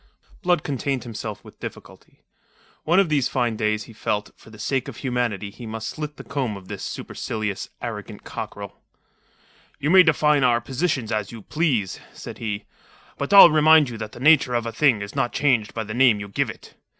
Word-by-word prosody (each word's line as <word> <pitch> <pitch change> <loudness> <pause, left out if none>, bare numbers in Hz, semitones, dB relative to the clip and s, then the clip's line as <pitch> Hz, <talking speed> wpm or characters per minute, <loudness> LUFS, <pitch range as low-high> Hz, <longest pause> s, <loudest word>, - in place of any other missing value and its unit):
Blood 175 -4 +2
contained 135 -2 -2
himself 110 -2 -6
with - - -15
difficulty. - - -11 0.6
One 170 +4 +4
of 195 -4 +3
these 145 -4 +2
fine 120 -4 0
days, 105 -1 0
he 115 - -13
felt, 105 -1 -2
that - - -21
for - - -16
the 110 - -13
sake 130 +4 -1
of - - -8
humanity 120 -6 -2
he 120 +2 -10
must 110 0 -5
slit 150 -1 -6
the - - -9
comb 130 -7 -3
of 95 -1 -14
this - - -6
supercilious, 105 -3 -4
arrogant - - -6
cockerel. - - -7 1.0
"You 150 +2 -1
may 190 0 +9
define 150 -4 +3
our 120 -2 +4
positions 130 -1 -2
as 105 -2 -2
you 115 -3 -10
please," 130 - -1
said - - -9
he. 105 -3 -4 0.5
"But 140 - -3
I'll 195 -4 +10
remind 155 -2 +6
you 115 - -7
that 110 -1 -6
the - - -10
nature 140 -3 +4
of 120 -1 0
a 115 - -3
thing 120 -6 +2
is 100 - -9
not 135 -3 0
changed 125 -7 +1
by 115 - -2
the 110 0 -6
name 120 -3 +4
you 100 0 -7
give 100 - -1
it. - - -11
120 Hz, 200 wpm, -23 LUFS, 110-145 Hz, 1.0 s, I'll